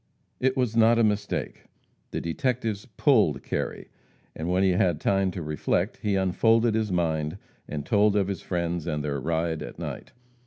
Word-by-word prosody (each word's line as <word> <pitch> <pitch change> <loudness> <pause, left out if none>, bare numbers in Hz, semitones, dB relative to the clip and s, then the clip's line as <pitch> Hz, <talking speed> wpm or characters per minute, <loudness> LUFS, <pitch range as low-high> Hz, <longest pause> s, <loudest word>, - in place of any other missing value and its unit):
It 130 +1 +1
was 125 -3 0
not 115 0 +5
a 115 - +4
mistake. 105 -1 -1 0.4
The - - -3
detectives 110 +4 -2
"pulled" 105 - +2
Kerry, - - -4 0.5
and 80 +2 -4
when 90 +2 +2
he 95 - +4
had 90 -3 +2
time 95 +1 +2
to 90 -2 -5
reflect, 75 - -1
he 105 -3 -1
unfolded 110 +5 +3
his 110 -2 0
mind, 80 -1 0 0.3
and 75 -1 -5
told 105 +2 +3
of 100 -2 +2
his 100 -1 -3
friends 85 -2 -2
and 75 -3 -2
their 70 -1 -2
ride 80 +1 -1
at - - -7
night. - - -6
95 Hz, 170 wpm, -26 LUFS, 85-110 Hz, 0.5 s, not